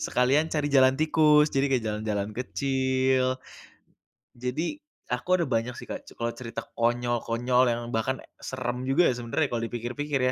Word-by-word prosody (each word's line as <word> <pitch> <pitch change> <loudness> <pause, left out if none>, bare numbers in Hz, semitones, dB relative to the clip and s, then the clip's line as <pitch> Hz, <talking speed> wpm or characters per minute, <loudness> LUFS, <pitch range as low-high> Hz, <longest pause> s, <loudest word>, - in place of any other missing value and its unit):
sekalian 140 +6 +2
cari 150 -2 0
jalan 130 -1 +5
tikus, 155 -1 +4
jadi 135 +1 +3
kayak 125 -4 +1
jalan-jalan 105 -1 -2
kecil. 130 0 0 1.0
Jadi 130 - -2 0.3
aku 175 +9 +1
ada - - +1
banyak 115 +1 0
sih, - - -10
Kak, - - -6
c - - -13
kalau 115 0 -1
cerita 115 -1 -6 0.2
konyol-konyol 120 +1 +1
yang 120 +1 -2
bahkan 130 +4 -1
ya - - -16 0.2
seram 125 -1 -3
juga 135 +6 +4
ya - - +1
sebenarnya 120 +6 0
kalau 115 -1 -2
dipikir-pikir 125 +5 -3
130 Hz, 155 wpm, -27 LUFS, 120-140 Hz, 1.0 s, jalan